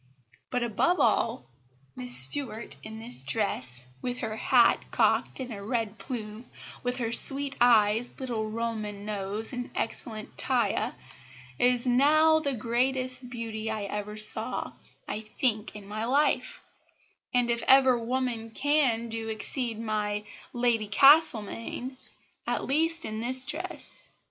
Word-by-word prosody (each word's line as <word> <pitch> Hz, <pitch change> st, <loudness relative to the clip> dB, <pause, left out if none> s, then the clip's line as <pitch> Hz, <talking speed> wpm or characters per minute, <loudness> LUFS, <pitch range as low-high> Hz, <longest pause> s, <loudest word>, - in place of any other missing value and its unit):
But, 250 Hz, -1 st, -1 dB
above 270 Hz, -, +1 dB
all, 220 Hz, -, +1 dB, 0.5 s
Mrs 125 Hz, 0 st, -3 dB
Stuart 215 Hz, -, +6 dB
in 220 Hz, 0 st, -9 dB
this 225 Hz, -, -1 dB
dresse, 130 Hz, -, +1 dB, 0.2 s
with 245 Hz, 0 st, -3 dB
her 220 Hz, -2 st, -3 dB
hat 235 Hz, +1 st, +3 dB
cocked -, -, +1 dB
and 250 Hz, -3 st, -5 dB
a 200 Hz, -, -8 dB
red 225 Hz, 0 st, -3 dB
plume, 225 Hz, -2 st, -7 dB, 0.4 s
with 250 Hz, 0 st, -2 dB
her 230 Hz, -3 st, -2 dB
sweet 275 Hz, +2 st, +2 dB
eyes, 225 Hz, -1 st, +4 dB
little 230 Hz, -5 st, -4 dB
Roman 215 Hz, -3 st, -4 dB
nose, 210 Hz, +2 st, -4 dB
and 245 Hz, 0 st, -5 dB
excellent 220 Hz, -1 st, -5 dB
taille, -, -, 0 dB, 0.6 s
is 245 Hz, 0 st, +3 dB
now 305 Hz, +5 st, +4 dB
the 280 Hz, -4 st, -2 dB
greatest 255 Hz, +2 st, -2 dB
beauty 225 Hz, -2 st, -5 dB
I 220 Hz, -1 st, -3 dB
ever 210 Hz, +1 st, -5 dB
saw, 215 Hz, 0 st, 0 dB, 0.3 s
I -, -, -3 dB
think, 215 Hz, -1 st, -2 dB
in 205 Hz, -2 st, -10 dB
my 215 Hz, +2 st, -3 dB
life; 280 Hz, +5 st, 0 dB, 0.7 s
and, 245 Hz, -1 st, +2 dB
if 235 Hz, -, -1 dB
ever 260 Hz, -2 st, +6 dB
woman 235 Hz, -1 st, -3 dB
can, 265 Hz, -3 st, +1 dB
do 225 Hz, 0 st, -5 dB
exceed 225 Hz, +1 st, -2 dB
my 210 Hz, -2 st, -2 dB, 0.3 s
Lady 240 Hz, -3 st, 0 dB
Castlemaine, 255 Hz, -1 st, +3 dB, 0.5 s
at -, -, -1 dB
least 325 Hz, +4 st, 0 dB
in 215 Hz, 0 st, -5 dB
this 255 Hz, +3 st, +1 dB
dress. 340 Hz, +4 st, -5 dB
230 Hz, 135 wpm, -27 LUFS, 215-255 Hz, 0.7 s, Stuart